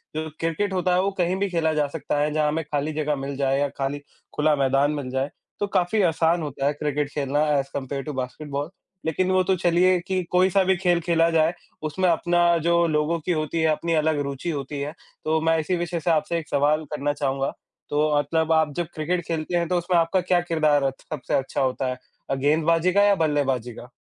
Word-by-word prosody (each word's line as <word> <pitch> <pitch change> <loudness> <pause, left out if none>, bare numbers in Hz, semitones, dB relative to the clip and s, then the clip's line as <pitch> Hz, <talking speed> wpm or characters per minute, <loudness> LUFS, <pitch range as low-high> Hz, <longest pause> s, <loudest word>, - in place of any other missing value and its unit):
जो 160 0 -3
क्रिकेट 165 +5 -1
होता 180 -1 +1
है, 185 - +3
वो 200 +1 0
कहीं 180 +1 +1
भी 200 -1 0
खेला 160 -2 +1
जा 150 -1 +1
सकता 150 0 -3
है, 150 +1 +1
जहाँ 155 -1 +2
हमें 155 +2 -1
खाली 150 +1 -2
जगह 150 -1 -1
मिल 135 0 -5
जाए 135 0 +1
या 145 - +2
खाली 140 +1 -2 0.4
खुला 150 0 +3
मैदान 135 +1 +2
मिल 140 -4 -4
जाए, 135 +2 -1 0.3
तो 205 - 0
काफ़ी 195 +3 +1
आसान 165 0 +2
होता 140 -2 -4
है 145 - +2
क्रिकेट 145 -1 -2
खेलना 145 0 -1 0.2
ऐज़ 135 0 -1
कम्पेयर 135 0 -4
टू 150 - -5
बास्केटबॉल। 140 +3 -4 0.4
लेकिन 185 +4 0
वो 185 0 +3
तो 190 0 +2
चलिए 175 +1 +3
कि 185 -1 0
कोई-सा 185 +1 +4
भी 190 +1 +3
खेल 175 -1 +2
खेला 165 0 +2
जाए, 165 +1 +2 0.3
उसमें 180 +4 0
अपना 175 +1 +3
जो 170 0 +4
लोगों 155 +2 0
की 175 +3 -3
होती 155 0 -1
है, 160 - +3
अपनी 165 +2 -1
अलग 155 -1 +2
रुचि 140 +4 -4
होती 140 -1 -4
है। 145 +1 -3 0.3
तो 160 0 +2
मैं 165 0 +2
इसी 180 +4 -1
विषय 175 0 -2
से 170 +2 0
आपसे 155 +2 +1
एक 160 - -10
सवाल 150 +2 +2
करना 145 0 -1
चाहूँगा, 135 -1 -1 0.4
तो 150 +1 +2
आप 145 -1 +1
जब 160 0 +2
आप 155 -2 +2
जब 175 -2 -2
क्रिकेट 170 +2 -2
खेलते 165 +1 -1
हैं 170 -1 0
तो 180 - +2
उसमें 175 +1 +1
आपका 175 +3 +1
क्या 180 0 +2
किरदार 155 -4 +2
अच 135 -1 -2
सबसे 155 -4 -4
अच्छा 135 0 0
होता 130 0 0
है? 125 - -3 0.3
अ, 135 - +1
गेंदबाज़ी 160 +5 +2
का 200 - +5
या 205 -1 +5
बल्लेबाज़ी 135 -7 0
का? 125 +3 -12
155 Hz, 225 wpm, -24 LUFS, 145-175 Hz, 0.4 s, का